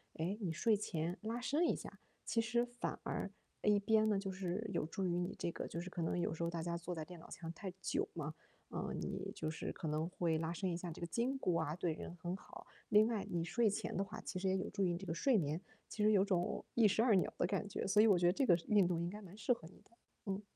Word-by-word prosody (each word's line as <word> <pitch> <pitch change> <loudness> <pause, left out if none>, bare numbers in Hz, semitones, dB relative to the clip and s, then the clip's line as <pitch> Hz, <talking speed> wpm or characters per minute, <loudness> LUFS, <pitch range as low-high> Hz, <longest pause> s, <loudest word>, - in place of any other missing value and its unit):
诶， 180 +6 -1
你 175 -4 0
睡 210 +6 +3
前 175 -2 -2
拉 225 +3 -2
伸 300 +7 +2
一 - - +2
下， - - -9 0.3
其 230 - +2
实 235 +2 +2
反 245 0 -4
而， - - -2 0.3
呃， 210 - +3
一 205 -1 +5
边 215 +1 +4
呢， 205 - +3
就 195 -1 -2
是 190 +3 -2
有 160 - +1
助 190 +4 -2
于 175 -1 +1
你 175 - -2
这 170 - -1
个 - - -4
就 170 - -4
是 185 - -6
可 175 - -4
能 165 +2 0
有 170 - 0
时 165 - -6
候 170 - +1
大 165 -1 -3
家 170 0 -1
坐 175 +1 -4
在 160 - -3
电 175 -1 -10
脑 - - -13
前 165 -1 -6
太 190 0 -5
久 - - 0
嘛， 155 -2 -4 0.4
嗯， - - -3
你 - - -3
就 155 - -2
是 160 - -4
可 160 - -5
能 155 +3 0
会 165 -3 +1
拉 160 0 -1
伸 185 +1 -1
一 - - -1
下 175 -1 -5
这 160 - -9
个 - - -1
筋 245 +9 0
骨 180 -9 +1
啊 160 -1 0
对 175 -3 0
人 175 - -7
很 175 +2 -3
好， - - -11 0.2
另 210 +1 +7
外 220 -4 -1
你 170 -1 0
睡 225 +4 +3
前 205 - -2
的 195 - +1
话 210 +2 -7
其 185 - -4
实 190 - 0
也 190 0 +3
有 185 - -2
助 195 - 0
于 175 -2 +2
你 - - -2
这 195 - -7
个 165 - -2
睡 250 +6 +3
眠， 155 +1 0 0.3
其 210 - -2
实 215 - +6
有 200 -1 +5
种 195 +1 0
一 225 -3 +6
石 220 +3 +3
二 235 -4 +5
鸟 185 - +2
的 - - +2
感 195 +2 -1
觉， - - -3
所 210 +2 +5
以 225 - +7
我 195 -4 +6
觉 175 - +2
得 175 - +6
这 270 - +2
个 175 - +8
运 205 -4 +5
动 170 -2 0
应 175 - -1
该 210 +1 -7
蛮 195 +1 -11
适 235 +3 +3
合 160 -8 -9
你 185 - -16
的， - - -27 0.3
嗯。 195 +1 -2
185 Hz, 310 characters per minute, -37 LUFS, 170-210 Hz, 0.4 s, 个